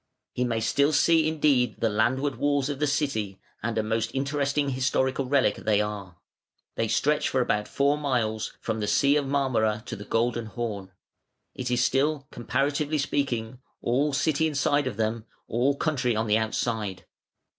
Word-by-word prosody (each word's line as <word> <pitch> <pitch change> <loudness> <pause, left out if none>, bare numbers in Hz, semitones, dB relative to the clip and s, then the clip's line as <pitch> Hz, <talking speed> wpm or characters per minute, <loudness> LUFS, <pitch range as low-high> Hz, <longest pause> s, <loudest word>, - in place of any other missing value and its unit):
He 125 - -1
may 115 -2 0
still 140 +6 +2
see 160 0 +4
indeed 145 -7 +2
the 115 - +2
land 110 +4 +2
ward 140 -4 -2
walls 145 +1 +1
of 140 -2 -4
the 150 - +1
city, 110 -10 -1 0.2
and 115 0 -2
a 110 - +1
most 115 +1 -1
interesting 140 +1 0
historical 130 +1 0
relic 130 -6 +2
they 105 -1 +1
are. 105 -4 -4 0.6
They 115 - -1
stretch 150 +6 +1
for 130 - 0
about 105 -4 0
four 140 +2 +1
miles, 115 -7 -1
from 110 -1 -2
the 105 - -2
Sea 140 +6 +3
of 145 -2 +1
Marmora 120 -6 +1
to - - -5
the 105 - -8
Golden 115 +1 0
Horn. 105 -3 -5 0.6
It 125 -1 -4
is 125 0 +2
still, 140 +2 +1
comparatively 145 +6 -1
speaking, 130 -5 -2 0.2
all 135 +5 +1
city 155 +2 +1
inside 145 -1 +1
of 110 -5 -4
them, 110 0 -1 0.2
all 130 +5 +1
country 130 -7 0
on 110 +1 0
the 105 0 +3
outside. 110 -3 -2
125 Hz, 170 wpm, -26 LUFS, 110-140 Hz, 0.6 s, see